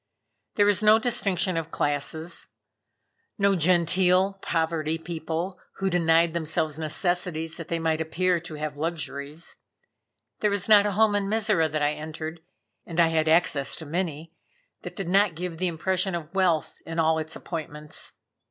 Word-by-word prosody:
There 205 - +4
was 205 -1 +3
no 215 +1 +6
distinction 200 -7 +1
of 165 -1 -3
classes; 155 +3 -1 0.9
no 200 -1 +3
genteel 180 +3 +3
poverty 160 -1 -1
people, 170 +2 -4 0.2
who 195 0 -1
denied 165 -1 +3
themselves 160 -2 -1
necessities 165 0 -1
that 165 - -7
they 170 - -1
might 160 -1 0
appear 175 +2 +1
to 165 -2 -8
have 150 -1 -4
luxuries. 155 0 -4 0.8
There 210 - +2
was 200 0 0
not 210 -1 +7
a 205 - -1
home 215 +1 +3
in 200 -1 0
Mizora 210 -7 +2
that 155 -1 -1
I 145 +1 +2
entered 155 +2 -6 0.4
and 170 0 -5
I 165 -1 +5
had 160 -1 +1
access 155 -4 +2
to 160 - -5
many 165 0 -3 0.5
that - - -8
did 195 -4 -4
not 195 -1 +3
give 170 -1 -5
the 185 - +1
impression 185 +2 0
of 165 0 -6
wealth 180 -5 +1
in 165 0 -7
all 160 -1 +3
its 160 0 -4
appointments. 150 -2 -5
165 Hz, 160 wpm, -26 LUFS, 160-185 Hz, 0.9 s, not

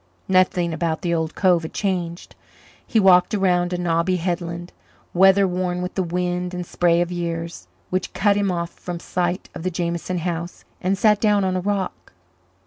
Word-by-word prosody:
Nothing 185 -2 +2
about 165 -1 -2
the 170 -1 0
old 160 -1 -1
cove 180 -3 +3
had 160 - -7
changed; 180 -4 -2 0.5
he 225 - +2
walked 190 0 +5
around 180 -3 +2
a 180 - -1
knobby 175 +1 +1
headland, 175 0 -3 0.4
weather 195 +2 +5
worn 180 0 -1
with 180 - -4
the 190 - 0
wind 180 +1 -2
and 180 0 -4
spray 170 0 +2
of 175 0 -1
years, 170 - -4 0.2
which 185 0 -1
cut 205 -1 +2
him 200 -2 +1
off 170 -1 -3
from 175 -1 -7
sight 180 +1 -2
of 175 - -7
the 185 - -1
Jameson 170 +1 -2
house, 170 0 -4 0.2
and 190 +1 +1
sat 210 0 +3
down 210 -2 +3
on 185 -1 0
a 185 - 0
rock. 195 - -3
180 Hz, 180 wpm, -22 LUFS, 170-185 Hz, 0.5 s, walked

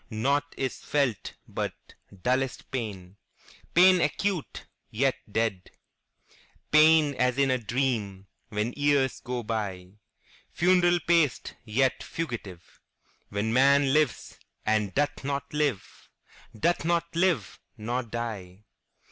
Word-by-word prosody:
Naught 140 +6 -1
is 130 -2 -3
felt 140 -7 -1
but - - -4 0.5
dullest 130 +1 -1
pain, 100 -7 -5 0.6
Pain 180 0 +7
acute, 180 +2 -2 0.2
yet 130 +4 +1 0.2
dead; 105 -5 -1 1.0
Pain 155 -1 +6
as 125 0 0
in 140 -1 +3
a 130 - +1
dream, 110 -5 -2 0.2
When 110 +2 -2
years 145 -2 +1
go 125 -1 -4
byFuneral 110 - -1
paced, 165 -6 +2
yet 130 +4 +1
fugitive, 105 - -7 0.5
When 105 +3 -2
man 140 +1 +4
lives, 150 -6 0 0.3
and 105 -2 +1
doth 145 0 0
not 140 +1 -3
live, 145 -8 -2 0.5
Doth 170 +9 +1
not 170 0 -1
live—nor 130 - -1
die. 105 -5 -6
130 Hz, 105 wpm, -27 LUFS, 110-150 Hz, 1.0 s, Pain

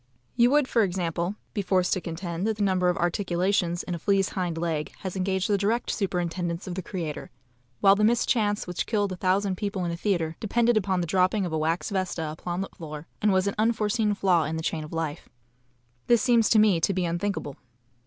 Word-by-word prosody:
You 240 0 +5
would, 290 0 +3
for 235 - +2
example, 175 -1 -1 0.2
be 205 - -1
forced 185 -1 +1
to 185 - -1
contend 170 +3 -4
that 220 -1 -1
the 210 - 0
number 185 -2 +2
of 180 - 0
articulations 175 0 0
in 180 - -4
a 170 - -4
flea's 195 +2 +2
hind 175 -4 -3
leg 165 -2 -2
has 190 -1 -5
engaged 190 0 0
the 205 -1 +1
direct 225 +4 0
superintendence 175 -2 -2
of 185 - -5
the 190 - -3
Creator, 165 -4 -5 0.5
while 195 - +7
the 210 - 0
mischance 220 -2 +2
which 180 -1 -3
killed 205 -3 0
a - - -3
thousand 185 +1 0
people 200 -2 -2
in 170 - -1
a - - -3
theatre 170 -4 -1
depended 235 +2 +2
upon 190 -3 +1
the - - -1
dropping 185 +3 +2
of 170 - -4
a - - +1
wax 165 +6 -1
vesta 180 -5 -2
upon 175 +3 -4
the 195 - -4
floor, 155 -2 -8 0.2
and 210 -1 +3
was 185 0 +2
an 200 - 0
unforeseen 215 -1 +1
flaw 180 -5 +3
in 155 +2 -3
the 160 - -4
chain 160 -1 -2
of 150 - -10
life. 160 -3 -4 0.8
This 235 -2 +4
seems 235 -4 +4
to 225 - +4
me 210 -6 +4
to 195 - +1
be 185 -1 0
unthinkable. 170 -4 -3
185 Hz, 215 wpm, -26 LUFS, 170-205 Hz, 0.8 s, while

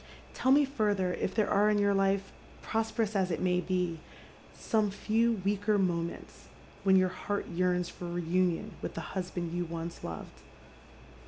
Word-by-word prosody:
" - - -22
Tell 260 - +2
me 285 +1 +6
further 205 -8 0
if 190 - -2
there 215 -2 +2
are 210 +1 +4
in 210 - +3
your 200 0 +3
life 195 0 +1 0.2
— - - -22
prosperous 220 -1 -1
as 190 -2 +2
it 165 - -1
may 180 -1 +2
be 180 -2 -1 0.3
— - - -23
some 215 -2 +1
few 225 +3 +1
weaker 205 +1 +2
moments 170 -3 -2 0.4
when 190 -1 +5
your 185 -1 +4
heart 200 +3 -3
yearns 180 0 +1
for 180 - -8
reunion 175 +3 0
with - - -5
the 165 - -5
husbacd 180 -2 -3
jou 175 +1 -1
once 165 0 -6
loved. 80 -1 -7
190 Hz, 175 wpm, -31 LUFS, 175-210 Hz, 0.4 s, me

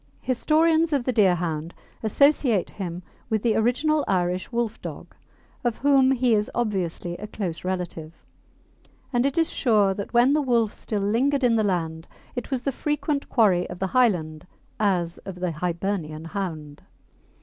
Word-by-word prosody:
Historians 315 +5 +2
of 275 -4 +1
the 255 - -1
Deerhound 175 -6 +1 0.3
associate 240 -2 +2
him 180 -2 -6 0.3
with 220 -2 0
the 230 -2 +2
original 285 +7 +2
Irish 180 -1 0
Wolfdog, 235 -2 -4 0.5
of 240 -2 0
whom 275 -1 +4
he 255 -2 +2
is 210 -1 +1
obviously 185 -6 -2
a 210 - -7
close 180 -6 -4
relative, 180 -4 -4 1.0
and 245 +2 +3
it 280 - -3
is 325 -1 +2
sure 210 -6 +3
that 200 +1 -6
when 245 +3 +4
the 305 - +3
wolf 235 -5 +1
still 205 -3 -3
lingered 265 +7 +1
in 240 -2 +4
the 220 - +3
land 165 -4 -2 0.3
it 245 - -4
was 260 -2 -2
the 275 - 0
frequent 295 +1 -2
quarry 195 -7 +3
of 180 - -7
the 190 - -1
Highland 175 -11 +1 0.3
as 180 -5 0
of 190 - -8
the 180 -1 -2
Hibernian 170 -1 -3
hound. 165 -6 -5
210 Hz, 155 wpm, -24 LUFS, 180-255 Hz, 1.0 s, whom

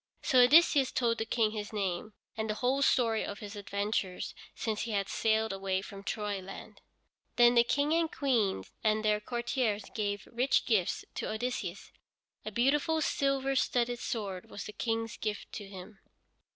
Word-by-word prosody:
So 255 - +4
Odysseus 275 +1 +6
told 230 -2 +1
the 225 - -2
King 220 -2 +2
his 210 -1 -5
name, 200 0 -2 0.2
and 220 0 -3
the 215 - 0
whole 255 +5 +1
story 230 -5 +3
of 205 - -5
his 210 0 -8
adventures 200 -2 -2 0.2
since 220 -2 -2
he 230 - -3
had 200 -1 0
sailed 220 -1 +1
away 195 -1 -1
from 200 -1 -9
Troyland. 200 -2 -5 0.5
Then 240 0 +6
the 235 -1 +6
King 285 +5 +1
and 330 -1 +1
Queen 225 - +1 0.2
and 215 0 +2
their 210 0 +3
courtiers 235 -2 -1
gave 205 -2 -2
rich 255 +3 +2
gifts 205 -7 +1
to - - -3
Odysseus. 220 -5 -4 0.5
A 215 - -5
beautiful 285 +8 +2
silver 275 -2 +1
studded 245 -2 +1
sword 200 -7 -4
was - - -6
the 210 - -8
King's 225 0 -2
gift 210 -1 -4
to 205 - -6
him. 195 +1 -11
220 Hz, 165 wpm, -31 LUFS, 205-245 Hz, 0.5 s, Odysseus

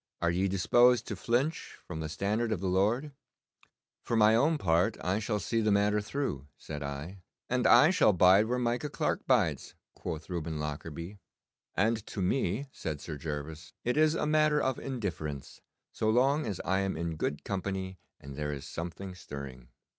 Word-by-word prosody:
Are 85 0 +1
ye 95 +3 +1
disposed 120 +5 +4
to - - -2
flinch 130 +7 -1
from 85 -3 -6
the 80 -1 -4
standard 105 +7 -1
of 105 - 0
the 95 - -4
Lord?' 110 +11 +1 0.9
'For 115 - -2
my 110 0 +6
own 150 +7 +3
part 85 - +2
I 95 +3 +1
shall 105 0 -1
see 115 +2 -1
the 105 -1 +2
matter 105 +1 +3
through,' 105 - -3
said 75 -1 -7
I. 70 +7 -6 0.3
'And 125 0 +2
I 125 +8 +7
shall 180 - +5
bide 95 +3 +5
where 125 +2 0
Micah 125 +4 -1
Clarke - - -2
bides,' - - +1 0.2
quoth 80 -2 -6
Reuben 80 -3 -3
Lockarby. 80 +5 -6 0.6
'And 110 +2 +1
to - - -6
me,' 100 +5 0
said 75 - -5
Sir 80 - -6
Gervas, 75 +2 -6
'it 125 - 0
is 155 +1 +4
a - - 0
matter 155 0 +3
of 130 -3 0
indifference, 85 - -5 0.3
so 110 - -1
long 135 +5 +3
as 100 -4 -3
I 95 +1 +2
am 95 -4 -1
in 85 -1 -3
good 75 -1 -3
company 95 -1 -3 0.2
and 70 0 -10
there 75 0 -3
is 70 -1 -6
something 85 +5 -6
stirring. 70 -7 -9
95 Hz, 175 wpm, -30 LUFS, 80-120 Hz, 0.9 s, I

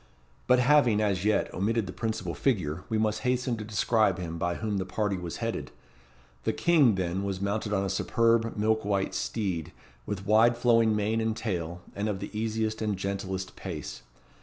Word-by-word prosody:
But 125 - +6
having, 125 -4 +4
as 100 -3 +1
yet, 105 0 +1
omitted 110 +3 0
the 90 - -7
principal 110 -6 -3
figure, 90 - -1
we 110 - +1
must 110 -1 +1
hasten 125 -1 0
to 110 - -5
describe 105 -2 +2
him 85 -2 -5
by 85 +1 0
whom 105 -2 -2
the - - 0
party 105 +1 -1
was 90 -3 -5
headed. - - -3 0.7
The - - 0
King, 150 - +4
then, 95 +1 -1
was 100 -2 -2
mounted 105 +2 -2
on 100 -1 +1
a - - -1
superb 115 +3 +1
milk 110 +1 +1
white 100 -1 0
steed, 95 -8 -2 0.4
with 100 -1 -4
wide 115 +3 +5
flowing 115 -2 +4
mane 110 +2 0
and 110 0 -1
tail, 90 -6 -3
and 105 +2 -1
of 100 - -1
the 100 +2 -7
easiest 110 0 -1
and 105 -3 -1
gentlest 95 -1 -4
pace. 80 -7 -6
105 Hz, 185 wpm, -28 LUFS, 95-110 Hz, 0.7 s, But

